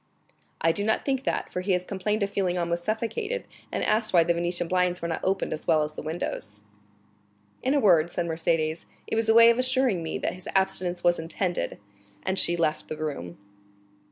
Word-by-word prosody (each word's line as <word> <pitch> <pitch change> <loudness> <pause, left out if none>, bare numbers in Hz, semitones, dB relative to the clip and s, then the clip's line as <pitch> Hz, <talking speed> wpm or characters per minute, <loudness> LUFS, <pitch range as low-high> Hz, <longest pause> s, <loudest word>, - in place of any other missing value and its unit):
"I 165 - +4
do 200 - -2
not 220 +1 0
think 270 -1 -1
that, - - -1
for 180 - -1
he 190 +1 0
has 180 0 0
complained 210 +3 -1
of 200 - -2
feeling 185 -3 0
almost 170 0 -1
suffocated, 415 - -2 0.3
and - - -2
asked 215 0 +1
why 170 - +7
the 170 +1 +2
Venetian 175 0 -1
blinds 180 0 +1
were 170 - -3
not 165 - -3
opened 190 +1 0
as 155 - -7
well 155 -1 +4
as 150 0 -4
the - - -6
windows." 125 -10 -5 1.0
"In 265 +3 +1
a - - +4
word," 175 - +4
said 175 - -1
Mercédès, 160 -1 0 0.2
"it - - -3
was 225 0 +1
a 225 - +5
way 230 0 +9
of 235 - -1
assuring 255 -7 +2
me 160 - -3
that - - -2
his 185 -1 -9
abstinence 185 -2 +1
was 175 0 +3
intended." 165 - -2 0.5
And 190 0 0
she 175 - +1
left 155 -2 0
the 155 - -5
room. 140 - -5
180 Hz, 210 wpm, -26 LUFS, 165-215 Hz, 1.0 s, way